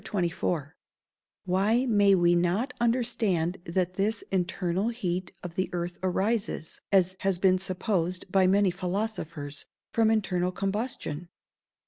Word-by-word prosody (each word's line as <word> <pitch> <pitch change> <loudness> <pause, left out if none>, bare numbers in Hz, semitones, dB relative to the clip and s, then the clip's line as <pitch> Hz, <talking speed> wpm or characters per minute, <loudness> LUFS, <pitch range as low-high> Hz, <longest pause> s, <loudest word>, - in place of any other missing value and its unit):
_Why 210 +8 +2
may 205 -3 +5
we 175 -1 +4
not 180 +9 +1
understand 230 -8 +1
that 180 +1 0
this 205 +2 0
internal 185 +2 0
heat 185 -6 -3
of 175 -2 -6
the 185 +1 -1
earth 175 0 -3
arises, 190 -1 -1
as 185 -1 +4
has 195 -2 +1
been 185 0 +3
supposed 185 -1 -2
by 190 -1 +4
many 195 0 +4
philosophers, 175 -6 -4 0.2
from 225 -1 +3
internal 190 -5 +1
combustion? 195 - -3
185 Hz, 115 wpm, -28 LUFS, 175-210 Hz, 0.2 s, may